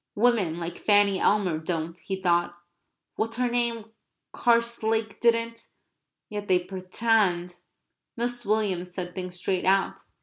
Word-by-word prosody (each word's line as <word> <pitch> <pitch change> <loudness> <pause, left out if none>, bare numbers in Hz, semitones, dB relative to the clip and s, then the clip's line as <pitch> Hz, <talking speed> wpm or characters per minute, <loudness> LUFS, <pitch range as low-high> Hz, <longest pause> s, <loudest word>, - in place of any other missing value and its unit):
"Women 210 -7 +2
like 170 0 -5
Fanny 205 -2 +4
Elmer 190 -6 +2
don't," 165 0 -3
he 190 +3 -5
thought. 175 -1 +1 0.6
"What's 225 +1 -1
her 250 -1 +1
name 235 -2 -1 0.4
Carslake 230 -2 +1
didn't; 230 0 +1 0.6
yet 205 -1 -6
they 185 - +4
pretend..." 185 -1 0 0.6
Mrs. 240 +1 -2
Williams 195 -4 0
said 180 -2 -5
things 180 -1 -5
straight 180 0 -1
out. 195 +1 +2
200 Hz, 125 wpm, -26 LUFS, 180-230 Hz, 0.6 s, Fanny